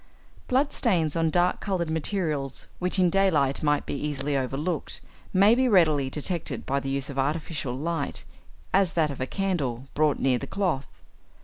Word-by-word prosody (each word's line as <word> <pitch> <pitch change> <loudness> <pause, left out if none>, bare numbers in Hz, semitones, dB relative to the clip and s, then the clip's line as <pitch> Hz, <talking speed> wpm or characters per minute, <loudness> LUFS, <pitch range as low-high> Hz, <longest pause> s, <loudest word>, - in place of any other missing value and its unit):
= - - -27
Blood 270 +3 +1
stains 170 - +1
on 165 -1 +2
dark 175 +2 +2
coloured 180 -5 -2
materials, 155 -5 -2
which 180 +2 0
in 180 -2 +4
daylight 160 -9 +2
might 145 -1 +1
be - - -4
easily 145 0 -2
overlooked, 140 +6 -2 0.3
may 200 +3 +6
be 260 +2 +3
readily 155 - +4
detected 155 +4 -1
by 140 +1 0
the 135 - -5
use 140 +1 -2
of 135 - -4
artificial 145 -2 -2
light, 160 0 -2 0.5
as 190 -3 +3
that 155 -3 +2
of 135 - -7
a 130 - -1
candle, 145 - -2
brought 150 -2 +2
near 130 -2 +2
the 140 - -6
cloth. 175 -9 -1
155 Hz, 175 wpm, -26 LUFS, 140-180 Hz, 0.5 s, may